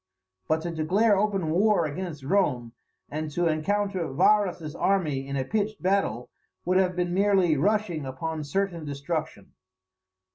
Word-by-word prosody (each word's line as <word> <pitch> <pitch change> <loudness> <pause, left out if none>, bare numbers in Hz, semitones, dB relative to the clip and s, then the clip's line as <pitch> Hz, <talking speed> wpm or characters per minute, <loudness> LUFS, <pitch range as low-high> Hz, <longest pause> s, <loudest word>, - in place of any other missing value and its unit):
But 160 0 0
to 170 - -3
declare 190 +7 +2
open 195 -5 0
war 195 0 +3
against 155 -1 -5
Rome, 135 -9 0 0.4
and 155 +1 -3
to 175 +2 0
encounter 185 +2 0
Varus's 180 -1 +2
army 155 -9 0
in 140 0 -3
a 130 - -1
pitched 215 +4 -2
battle, 185 - 0 0.3
would 185 +1 +2
have 185 -1 +1
been 175 -1 -1
merely 190 -4 +3
rushing 190 -1 0
upon 155 +4 -4
certain 170 +2 -2
destruction. 145 - -4
175 Hz, 140 wpm, -26 LUFS, 150-195 Hz, 0.4 s, war